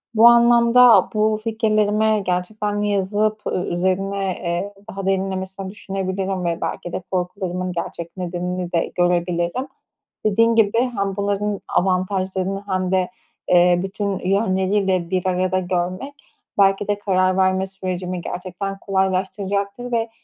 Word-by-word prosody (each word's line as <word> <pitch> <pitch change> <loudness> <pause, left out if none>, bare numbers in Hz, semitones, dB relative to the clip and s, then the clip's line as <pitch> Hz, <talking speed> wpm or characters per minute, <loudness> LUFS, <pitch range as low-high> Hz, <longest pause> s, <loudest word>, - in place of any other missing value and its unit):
Bu 225 +2 +8
anlamda 235 0 +6
bu 215 0 +2
fikirlerimi 215 -1 +1
gerçekten 205 +3 -1
de 210 - 0
yazıp 205 +2 0 0.3
üzerine, 195 +3 -1 0.2
eee, 175 +4 -2 0.3
derinlemesine 190 0 -2
düşünebilirim 190 -1 -3
ve 170 0 -1
belki 175 - -4
de - - -3
korkularımın 185 0 -2
gerçek 170 0 -6
nedenini 180 0 -3
de 170 - 0
görebilirim. 175 +6 0 0.6
Dediğin 230 +2 +3
gibi 225 -1 +3
hem 200 -6 -1
bunların 200 0 -1
avantajlarını 190 +1 0
hem 185 -1 -1
de, 185 -1 +1 0.4
eee, 175 0 +5
bütün 195 0 -3
yönleriyle 190 -2 +1
bir 185 0 -1
arada 185 +1 +1
görmek 185 +8 -2 0.4
belki 195 0 +3
de 205 0 0
karar 185 -2 +1
verme 190 0 +2
sürecimi 185 -2 -4
gerçekten 185 +3 -5
kolaylaştıracaktır 200 +4 -1
ve, 230 -1 0
190 Hz, 120 wpm, -21 LUFS, 185-205 Hz, 0.6 s, Bu